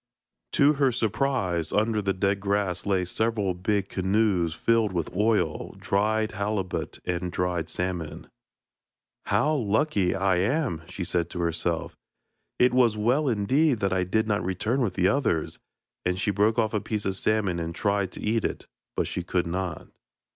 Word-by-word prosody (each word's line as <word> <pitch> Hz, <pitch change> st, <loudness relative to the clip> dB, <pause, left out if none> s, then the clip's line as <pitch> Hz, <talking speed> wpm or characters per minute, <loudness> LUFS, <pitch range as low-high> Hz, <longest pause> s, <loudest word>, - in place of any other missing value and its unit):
To 145 Hz, +2 st, +5 dB
her 135 Hz, -2 st, +5 dB
surprise, 110 Hz, -, 0 dB
under 110 Hz, 0 st, +1 dB
the 100 Hz, -1 st, 0 dB
dead 100 Hz, +1 st, 0 dB
grass 100 Hz, -2 st, -1 dB
lay 95 Hz, -2 st, +2 dB
several 105 Hz, 0 st, 0 dB
big 95 Hz, +2 st, -1 dB
canoes 95 Hz, -4 st, +1 dB
filled 115 Hz, -2 st, +2 dB
with 85 Hz, -1 st, -3 dB
oil, 100 Hz, -6 st, +1 dB
dried 110 Hz, +2 st, +1 dB
halibut 100 Hz, -2 st, -3 dB
and 90 Hz, 0 st, -2 dB
dried 90 Hz, -2 st, -1 dB
salmon. 85 Hz, -3 st, -3 dB, 1.0 s
'How 155 Hz, -, +2 dB
lucky 110 Hz, -5 st, +1 dB
I 95 Hz, -1 st, +2 dB
am!' 115 Hz, -, 0 dB
she 95 Hz, -, -5 dB
said 85 Hz, -1 st, -1 dB
to 85 Hz, -, -4 dB
herself; 85 Hz, 0 st, -1 dB, 0.6 s
'it 125 Hz, 0 st, +4 dB
was 120 Hz, -4 st, +4 dB
well 125 Hz, +8 st, +2 dB
indeed 130 Hz, +4 st, +2 dB
that 100 Hz, -1 st, +1 dB
I 95 Hz, -1 st, +1 dB
did 110 Hz, +5 st, 0 dB
not 105 Hz, -1 st, 0 dB
return 105 Hz, +8 st, -1 dB
with 115 Hz, -6 st, 0 dB
the 90 Hz, -1 st, +3 dB
others,' 100 Hz, -, 0 dB, 0.4 s
and 90 Hz, 0 st, 0 dB
she 105 Hz, -, +1 dB
broke 105 Hz, +3 st, +2 dB
off 110 Hz, -2 st, +1 dB
a 105 Hz, -, 0 dB
piece 105 Hz, -2 st, -3 dB
of 95 Hz, -, 0 dB
salmon 100 Hz, -4 st, 0 dB
and 85 Hz, 0 st, -4 dB
tried 100 Hz, -2 st, 0 dB
to -, -, -8 dB
eat 110 Hz, +1 st, 0 dB
it, -, -, -3 dB, 0.3 s
but -, -, +1 dB
she -, -, -3 dB
could 90 Hz, +1 st, -1 dB
not. 85 Hz, -1 st, -3 dB
100 Hz, 165 wpm, -26 LUFS, 90-110 Hz, 1.0 s, To